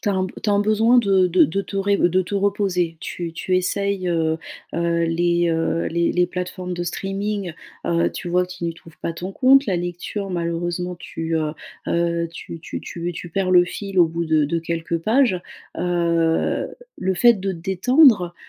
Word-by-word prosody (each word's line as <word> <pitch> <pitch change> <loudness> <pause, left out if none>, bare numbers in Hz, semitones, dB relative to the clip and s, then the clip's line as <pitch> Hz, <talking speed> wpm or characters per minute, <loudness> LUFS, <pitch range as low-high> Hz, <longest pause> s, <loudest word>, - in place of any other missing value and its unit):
tu - - -2
as - - +1
un 190 - 0
b 185 - -5
tu - - -1
as - - +3
un 200 - +3
besoin 215 +3 +3
de 195 -5 +4
de 180 +1 +4
de 195 +5 -1
te 200 - -7
ré 200 +1 +2
de 185 0 +2
te 180 - -10
reposer, 195 -4 0
tu 170 -1 -5
tu 185 +2 -1
essayes, 195 +1 -1
heu 160 -2 0 0.4
heu, 170 0 +1
les, 170 +1 +1
heu, 165 0 0
les 170 0 +1
les 180 0 +2
plateformes 180 0 -5
de 175 0 -3
streaming, 195 +1 -3 0.3
heu, 170 0 +2
tu - - -6
vois 180 +1 +2
que 180 - -9
tu 175 - -12
n'y 165 -1 -2
trouves 165 -2 -17
pas 165 - -2
ton 180 +3 -6
compte. 270 +5 +5
La 190 - 0
lecture 175 +3 -4
malheureusement 175 +1 -2
tu, 165 -1 -4
heu 155 -1 0 0.4
heu 170 0 0
tu 165 0 -8
tu - - -6
tu 170 0 -5
tu 175 +1 -7
perds 185 +2 -1
le 175 -1 +7
fil 195 +1 -5
au 175 - +7
bout 165 +1 -3
de 155 -2 +2
de 165 +4 -1
quelques 165 0 -2
pages, 220 +1 +2 0.4
heu, 170 -2 +1 0.3
le 190 0 -1
fait 235 +6 +6
de 195 -1 -3
te 175 - -7
détendre, 190 - +4
180 Hz, 205 wpm, -22 LUFS, 170-195 Hz, 0.4 s, le